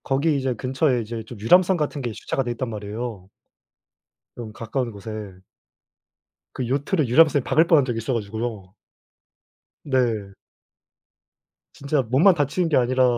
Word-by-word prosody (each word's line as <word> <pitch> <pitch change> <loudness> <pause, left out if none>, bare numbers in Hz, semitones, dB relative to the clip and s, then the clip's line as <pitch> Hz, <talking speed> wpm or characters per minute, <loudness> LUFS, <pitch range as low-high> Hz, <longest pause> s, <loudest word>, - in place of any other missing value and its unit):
거기 145 +3 +1
이제 130 -2 -1
근처에 130 +1 0
이제 115 0 -6
좀 110 0 -11
유람선 180 - +4
같은 150 -2 -2
게 120 -2 -3
주차가 135 +4 -3
돼 120 - -3
있단 120 +1 -4
말이에요. 105 -2 -6 1.1
좀 115 -3 -8
가까운 115 +2 -3
곳에. 100 -2 -8 1.1
그 125 - -3
요트를 145 +4 0
유람선이 145 +2 +4
박을 160 +5 +3
뻔한 155 -6 +5
적이 120 -3 -2
있어 115 +3 -2
가지고요. 110 -3 -4 1.1
네. 120 -7 0 1.4
진짜 140 0 -1
몸만 135 - +4
다치는 165 +3 0
게 155 - +3
아니라 130 +1 +2
125 Hz, 290 characters per minute, -23 LUFS, 110-140 Hz, 1.4 s, 뻔한